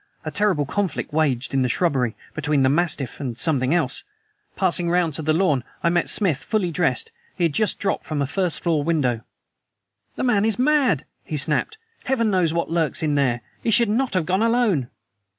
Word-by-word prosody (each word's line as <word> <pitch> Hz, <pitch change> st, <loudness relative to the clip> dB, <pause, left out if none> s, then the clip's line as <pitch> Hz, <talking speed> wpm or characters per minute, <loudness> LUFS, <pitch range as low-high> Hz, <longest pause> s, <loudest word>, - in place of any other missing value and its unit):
A 155 Hz, -, -3 dB
terrible 185 Hz, -4 st, +1 dB
conflict 180 Hz, -2 st, -3 dB
waged 140 Hz, -5 st, 0 dB
in 135 Hz, -, +2 dB
the 125 Hz, -, +1 dB
shrubbery, 130 Hz, -6 st, 0 dB, 0.2 s
between 150 Hz, -2 st, +1 dB
the 130 Hz, -, +4 dB
mastiff 150 Hz, -4 st, 0 dB
and 125 Hz, -5 st, -4 dB
something 135 Hz, -3 st, +1 dB
else. 160 Hz, -6 st, 0 dB, 0.5 s
Passing 175 Hz, -2 st, +2 dB
round 175 Hz, -2 st, +1 dB
to 160 Hz, -, -3 dB
the 155 Hz, 0 st, 0 dB
lawn, 155 Hz, -6 st, +2 dB, 0.2 s
I 170 Hz, -, +3 dB
met 175 Hz, 0 st, +1 dB
Smith 185 Hz, -10 st, +1 dB
fully 205 Hz, -5 st, -1 dB
dressed. 180 Hz, -, 0 dB, 0.2 s
He 175 Hz, -3 st, +2 dB
just 215 Hz, +8 st, 0 dB
had -, -, -21 dB
dropped 195 Hz, -, -1 dB
from 155 Hz, -2 st, -3 dB
a 140 Hz, -, +1 dB
first 180 Hz, +4 st, -1 dB
floor 160 Hz, -4 st, +1 dB
window. 140 Hz, -8 st, 0 dB, 0.9 s
"The -, -, -3 dB
man 230 Hz, -5 st, +2 dB
is 220 Hz, -2 st, +1 dB
mad!" 260 Hz, -, +2 dB, 0.2 s
he 155 Hz, -, -4 dB
snapped. 150 Hz, -, +1 dB, 0.3 s
"Heaven 230 Hz, -5 st, +1 dB
knows 180 Hz, -4 st, +2 dB
what 170 Hz, -1 st, -2 dB
lurks 165 Hz, -4 st, 0 dB
there! 140 Hz, -6 st, +1 dB, 0.2 s
He -, -, -1 dB
should 235 Hz, 0 st, +4 dB
not 240 Hz, +1 st, 0 dB
have 175 Hz, -4 st, +1 dB
gone 185 Hz, +4 st, 0 dB
alone!" 225 Hz, -, +1 dB
165 Hz, 190 wpm, -22 LUFS, 145-200 Hz, 0.9 s, the